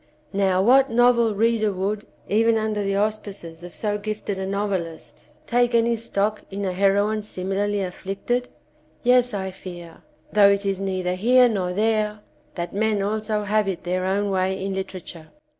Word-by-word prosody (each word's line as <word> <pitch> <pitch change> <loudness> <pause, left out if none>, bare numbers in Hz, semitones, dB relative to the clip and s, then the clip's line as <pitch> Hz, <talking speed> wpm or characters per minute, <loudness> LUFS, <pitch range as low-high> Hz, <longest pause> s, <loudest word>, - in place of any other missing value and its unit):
Now 190 -1 +2
what 265 +5 +5
novel 235 -2 +4
reader 220 0 +2
would, 200 +2 -3 0.2
even 225 +2 +3
under 215 -1 -1
the 195 -1 -1
auspices 200 -5 -3
of 175 -1 -10
so 210 -1 -1
gifted 210 -2 -4
a 190 - -3
novelist, 195 -5 -4 0.2
take 245 0 +2
any 235 0 +3
stock 215 -2 -1
in 200 +1 -4
a 185 - -1
heroine 200 +3 +2
simi 195 -2 -4
larly 205 0 0
afflicted? 195 +7 -3 0.5
Yes 250 0 +4
I 190 -1 -3
fear, 175 -3 -10 0.3
though 205 -1 +7
it 200 0 +1
is 195 -1 0
neither 185 -2 -1
here 245 +7 +5
nor 190 -6 -1
there, 215 0 0 0.3
that 170 -1 -4
men 210 0 +1
also 215 +1 -1
have 210 0 +1
it 190 -3 -3
their 180 +1 -1
own 200 +1 0
way 190 0 0
in 195 - -2
literature. 185 -4 -6
205 Hz, 165 wpm, -23 LUFS, 190-215 Hz, 0.5 s, though